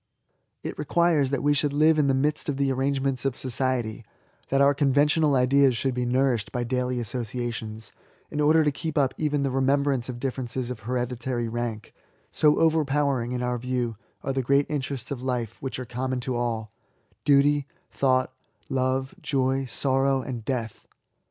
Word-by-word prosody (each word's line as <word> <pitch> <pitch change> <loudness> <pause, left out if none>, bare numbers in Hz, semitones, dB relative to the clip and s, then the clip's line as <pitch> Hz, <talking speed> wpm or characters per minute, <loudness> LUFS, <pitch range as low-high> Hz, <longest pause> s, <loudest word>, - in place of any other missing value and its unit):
It - - -5
requires 155 -2 +2
that 140 - -1
we 145 0 +4
should 145 0 0
live 155 +2 +4
in 145 - +3
the 135 - +3
midst 150 +3 0
of 140 - -1
the 140 -1 +1
arrangements 135 0 0
of 135 -2 -1
society, 125 -4 -1 0.5
that 135 - +2
our 140 +1 +5
conventional 145 +1 +3
ideas 130 0 +4
should 135 +1 0
be 125 0 -1
nourished 125 -3 +1
by 125 - -2
daily 125 0 -1
associations, 115 -1 -4 0.4
in 150 - -1
order 155 +2 +5
to 150 - +2
keep 160 +3 -4
up 135 -3 +2
even 150 -2 0
the 135 - 0
remembrance 135 -1 +1
of 120 -1 -5
differences 125 -1 -3
of 125 - -6
hereditary 125 +1 -2
rank, 115 -1 -4 0.4
so 150 -1 +3
overpowering 145 -6 +2
in 125 0 -2
our 125 0 -1
view 125 -2 -2 0.3
are 135 - -1
the 135 - 0
great 140 +3 +2
iQterests 140 -4 -4
of 130 -3 -4
life 125 -4 -3
which 135 - -4
are 130 - -5
common 125 +2 -3
to 125 +1 -2
all, 115 -3 -2 0.3
— - - -40
^Duty, 145 0 +4 0.3
Thought, 130 -1 +1 0.4
Love, 130 0 0
Joy, 135 -1 0
Sorrow, 135 +1 +1
and 120 -4 -5
Death. 115 -3 -4
130 Hz, 170 wpm, -26 LUFS, 125-140 Hz, 0.5 s, our